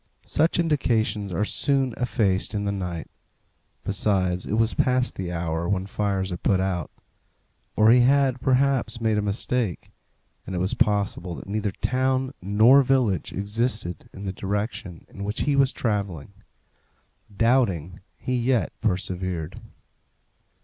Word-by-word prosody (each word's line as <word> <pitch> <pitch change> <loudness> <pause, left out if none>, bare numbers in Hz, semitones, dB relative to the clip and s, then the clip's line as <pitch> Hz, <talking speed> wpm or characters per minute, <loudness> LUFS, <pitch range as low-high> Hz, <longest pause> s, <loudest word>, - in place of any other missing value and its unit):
Such 160 +3 +2
indications 115 - +1
are 100 +5 0
soon 135 +1 0
effaced 105 -4 0
in 100 0 -1
the 100 - 0
night; 90 -4 -4 0.8
besides, 95 -2 0
it - - -3
was 115 0 +2
past 125 0 +1
the 90 -2 -4
hour 85 0 -2
when 95 -1 0
fires 100 -2 -1
are 90 - -3
put 95 0 +1
out. 95 -4 -1 0.9
Or 110 +1 +6
he 125 - +7
had, 135 0 +3
perhaps, 130 -2 +1
made 110 -2 +1
a - - +1
mistake, 105 0 -2 0.6
and 95 - -4
it - - -1
was 95 +2 0
possible 100 -5 0
that - - -9
neither 105 +1 -1
town 130 +5 0
nor 110 +8 +6
village 125 - +1
existed 105 -2 -2
in 100 - -9
the 95 - -3
direction 100 -3 -4
in 100 - -8
which 105 +2 -2
he 145 -1 +1
was 135 -1 +4
travelling. 100 - -3 1.0
Doubting, 100 - +1 0.2
he 130 - -3
yet 120 -4 +1
persevered. 90 -4 -2
105 Hz, 140 wpm, -25 LUFS, 95-125 Hz, 1.0 s, he